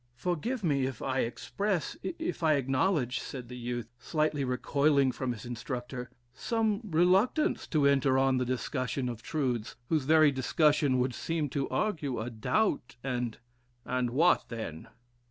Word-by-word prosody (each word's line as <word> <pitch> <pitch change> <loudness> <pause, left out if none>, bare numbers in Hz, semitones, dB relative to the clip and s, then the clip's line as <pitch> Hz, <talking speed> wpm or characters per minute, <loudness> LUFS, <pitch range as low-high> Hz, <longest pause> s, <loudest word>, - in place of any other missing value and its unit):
"Forgive 180 - -2
me 140 -6 +2
if 130 -4 -6
I 130 0 0
express 195 - -2
if 335 - -4
I 160 -2 +4
acknowledge," 135 -1 +1
said 125 -3 -7
the 125 - -7
youth, 120 -1 -4
slightly 150 +3 0
recoiling 140 +2 +2
from 130 0 -3
his 120 0 -7
instructor, 125 +1 -5 0.2
"some 220 - 0
reluctance 190 - +2
to 150 -4 +2
enter 135 -1 +4
on 135 -1 +3
the 125 - +1
discussion 130 +1 -2
of 120 -2 -5
truths, 125 -8 -2
whose 155 -5 +1
very 155 0 +6
discussion 140 0 +2
would 125 0 +1
seem 160 0 -2
to 140 +1 -2
argue 155 - -1
a 115 +2 -4
doubt, 125 - 0
and" 125 -3 -2 0.5
"And 125 -1 0
what 155 +9 +3
then!" 110 -9 -6
135 Hz, 150 wpm, -30 LUFS, 125-160 Hz, 0.5 s, very